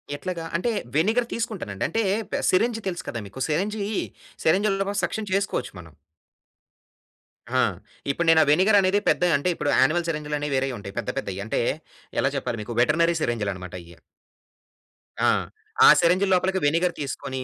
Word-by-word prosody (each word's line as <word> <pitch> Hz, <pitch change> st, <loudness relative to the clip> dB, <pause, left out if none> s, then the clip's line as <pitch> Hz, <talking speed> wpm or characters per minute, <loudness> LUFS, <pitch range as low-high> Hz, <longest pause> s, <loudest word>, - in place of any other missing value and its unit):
ఎట్లాగా? 170 Hz, +2 st, -5 dB
అంటే 210 Hz, +8 st, 0 dB, 0.2 s
వెనిగర్ 220 Hz, +10 st, +2 dB
తీసుకుంటానండి. 205 Hz, -, -4 dB
అంటే 225 Hz, +7 st, 0 dB, 0.5 s
సిరంజ్ 225 Hz, +5 st, +2 dB
తెలుసు 175 Hz, -2 st, -4 dB
కదా 115 Hz, -, -4 dB
మీకు 100 Hz, -, -11 dB
సిరంజీ 200 Hz, +7 st, -1 dB, 0.6 s
సిరంజీలతో 195 Hz, +3 st, +2 dB
కూడా 205 Hz, 0 st, -1 dB
సక్షన్ 215 Hz, -2 st, -2 dB
చేసుకోవచ్చు 195 Hz, 0 st, -1 dB
మనం. 80 Hz, -3 st, -13 dB, 1.7 s
ఆ! -, -, +5 dB, 0.5 s
ఇప్పుడు 170 Hz, +5 st, -2 dB
నేను 165 Hz, 0 st, +6 dB
ఆ -, -, -1 dB
వెనిగర్ 190 Hz, +7 st, +5 dB
అనేది 190 Hz, +2 st, +2 dB
పెద్ద -, -, +2 dB
అంటే 160 Hz, +6 st, -1 dB
ఇప్పుడు 145 Hz, -, -2 dB
యానిమల్ 165 Hz, +6 st, +2 dB
సిరంజ్‌లు 150 Hz, -2 st, -2 dB
అనేవి 145 Hz, -1 st, -3 dB
వేరేయి 130 Hz, -1 st, 0 dB
ఉంటాయి. 100 Hz, -1 st, -9 dB
పెద్ద -, -, -4 dB
పెద్దయి 100 Hz, 0 st, -5 dB
అంటే 110 Hz, -, -1 dB, 0.6 s
ఎలా 140 Hz, -, +1 dB
చెప్పాలి 115 Hz, -3 st, -3 dB
మీకు? 120 Hz, +2 st, -7 dB
వెటెర్నరి 165 Hz, +5 st, +3 dB
సిరంజిలన్నమాట 100 Hz, -, -3 dB
అయ్యి. 85 Hz, 0 st, -15 dB, 1.3 s
ఆ! -, -, +6 dB, 0.6 s
ఆ -, -, +10 dB
సిరంజి 180 Hz, +3 st, +3 dB
లోపలికి 190 Hz, +1 st, +1 dB
వెనిగర్ 165 Hz, +4 st, +2 dB
తీసుకొని, 130 Hz, -1 st, -4 dB
165 Hz, 150 wpm, -24 LUFS, 130-195 Hz, 1.7 s, ఆ